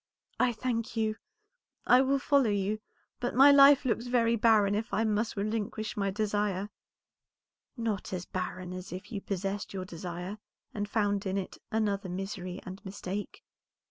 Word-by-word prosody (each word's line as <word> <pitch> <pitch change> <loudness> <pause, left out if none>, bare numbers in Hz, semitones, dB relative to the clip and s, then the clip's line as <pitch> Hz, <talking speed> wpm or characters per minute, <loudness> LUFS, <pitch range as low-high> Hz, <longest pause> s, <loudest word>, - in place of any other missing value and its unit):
"I 250 - +4
thank 230 0 -3
you, 220 -1 0 0.7
I 250 +1 +6
will 270 +1 +2
follow 275 -3 +3
you, 205 +1 0 0.4
but 245 - -2
my 275 +3 +9
life 280 0 +7
looks 235 0 0
very 235 -2 +3
barren 215 -3 +4
if 220 +3 -2
I 220 - +1
must 215 0 0
relinquish 215 +1 -2
my 200 -1 0
desire." 205 -1 -1 1.1
"Not 225 -4 -2
as 180 -1 -3
barren 185 0 -4
as 185 +1 -7
if 185 +6 -7
you 205 -3 -4
possessed 195 +1 -3
your 185 -1 -3
desire, 180 +3 -6 0.3
and 205 -1 -3
found 205 -1 0
in 190 +1 -1
it 190 - -5
another 205 -3 0
misery 185 0 -5
and 190 +2 -8
mistake. 195 0 -6
205 Hz, 155 wpm, -30 LUFS, 195-230 Hz, 1.1 s, my